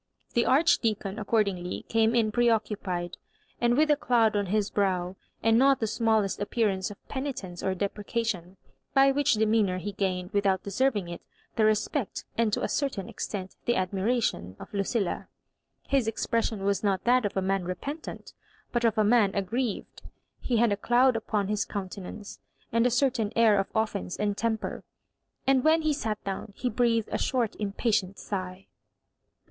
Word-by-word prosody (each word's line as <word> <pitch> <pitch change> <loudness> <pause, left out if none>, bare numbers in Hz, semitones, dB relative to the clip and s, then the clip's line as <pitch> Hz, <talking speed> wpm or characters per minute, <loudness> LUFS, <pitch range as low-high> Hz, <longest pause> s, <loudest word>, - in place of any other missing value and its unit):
The 235 - +2
Archdeacon, 220 -8 +2
accordingly, 200 -4 -1
came 225 +1 +2
in 220 -2 +2
preoccupied, 210 -6 0 0.4
and 240 +1 +2
with 305 0 +4
a - - +6
<doud 235 -6 +2
on 205 -1 0
his 210 +2 0
brow, 185 -2 0 0.3
and 225 +1 +4
not 275 +1 +5
the 225 - 0
smallest 220 -2 +1
appearance 205 -2 0
of 205 - -13
penitence 260 -11 -5
or 190 -1 -1
deprecation; 200 -1 -3 0.4
by 275 0 +6
which 285 -2 +2
demeanour 215 -3 +2
he 205 +3 -4
gained, 185 -2 -2
without 200 -2 +1
deserving 205 -2 0
it, 170 0 -7 0.3
the 220 - +3
respect, 215 +3 0
and 230 -2 +2
to - - -1
a - - +1
certain 275 -10 -2
extent 190 -3 -5
the 240 - +2
admiration, 190 - -1
of - - -11
Lucilla. 200 0 -1 0.6
His 270 -5 +2
expres 225 +1 0
sion 210 -4 -5
was 200 +1 0
not 195 -2 +1
that 250 +1 +4
of 205 -1 -2
a - - +2
man. 195 0 0
repentant, 275 - -6 0.4
but 240 -1 0
of 225 -2 +2
a 215 - +4
man 210 -2 +4
aggrieved. 210 +3 -2 0.4
He 240 - 0
had 230 -1 +3
a 200 - +1
cloud 245 +4 +3
upon 210 -3 -1
his 210 +1 0
coun 195 -3 -5
tenance, 200 +2 -9 0.3
and 230 +2 +3
a - - +2
certain 240 -4 +1
air 220 -3 +5
of 195 - 0
offence 215 - -1
and 205 -1 0
temper; 220 0 -2 0.6
and 265 -1 +3
when 320 +1 +4
he 310 -1 +2
sat 220 -7 -3
down, 195 +1 -5
he 250 - -2
breathed 230 -3 +1
a - - -1
short 240 -5 0
im 205 -2 -2
patient 205 -4 0
sigh. 185 -1 -5
215 Hz, 170 wpm, -28 LUFS, 195-235 Hz, 0.6 s, a